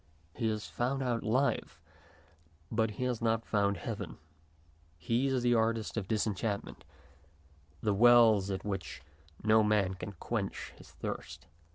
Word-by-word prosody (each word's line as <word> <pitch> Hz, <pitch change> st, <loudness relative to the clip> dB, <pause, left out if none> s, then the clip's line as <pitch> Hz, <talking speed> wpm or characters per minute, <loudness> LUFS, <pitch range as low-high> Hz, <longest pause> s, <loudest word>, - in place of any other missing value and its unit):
He 115 Hz, -3 st, -1 dB
has 110 Hz, -1 st, -3 dB
found 135 Hz, +3 st, -1 dB
out 120 Hz, -2 st, 0 dB
life, 115 Hz, -, 0 dB, 0.9 s
but 110 Hz, 0 st, +1 dB
he 105 Hz, +4 st, -5 dB
has 125 Hz, -3 st, -1 dB
not 115 Hz, -1 st, +1 dB
found 100 Hz, -1 st, +1 dB
heaven. -, -, -5 dB, 0.8 s
He 115 Hz, -, 0 dB
is 130 Hz, -2 st, 0 dB
the 120 Hz, 0 st, +4 dB
artist 115 Hz, -1 st, +1 dB
of 110 Hz, -5 st, -3 dB
disenchantment, 105 Hz, -1 st, -2 dB, 1.0 s
the 105 Hz, -, +2 dB
Wells 110 Hz, -2 st, +6 dB
at 95 Hz, 0 st, -3 dB
which 95 Hz, -7 st, -4 dB, 0.4 s
no 110 Hz, +1 st, +5 dB
man 105 Hz, -3 st, +2 dB
can 95 Hz, +1 st, -7 dB
quench 85 Hz, -, -4 dB
his -, -, -15 dB
thirst. -, -, -6 dB
110 Hz, 140 wpm, -32 LUFS, 100-120 Hz, 1.0 s, Wells